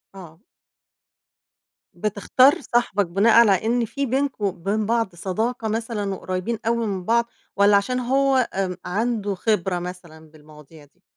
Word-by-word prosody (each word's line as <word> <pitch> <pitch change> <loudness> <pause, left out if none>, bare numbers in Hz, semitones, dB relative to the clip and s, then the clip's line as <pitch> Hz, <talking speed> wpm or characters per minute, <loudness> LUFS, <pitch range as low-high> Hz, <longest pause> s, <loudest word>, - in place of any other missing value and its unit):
آه. 170 -3 -12 1.5
بتختار 215 +7 +2
صاحبك 235 -6 0
بناءً 195 +7 +2
على 195 +1 +2
إن 235 0 +1
في 275 +5 -3
بينكم 265 -4 -1
وبين 200 +3 -2
بعض 225 -5 -1
صداقة 220 +6 -3
مثلًا 215 -3 -3
وقريّبين 185 +5 -4
أوي 230 -1 0
من 190 -3 -3
بعض، 235 +1 +2 0.3
والّا 200 0 +5
عشان 250 +5 -1
هو 265 0 +2
آمم، 185 -2 -2
عنده 210 0 -1
خبرة 190 -3 0
مثلًا 170 -3 -10
بالمواضيع 150 0 -16
دي؟ 180 +6 -34
205 Hz, 135 wpm, -22 LUFS, 180-235 Hz, 1.5 s, والّا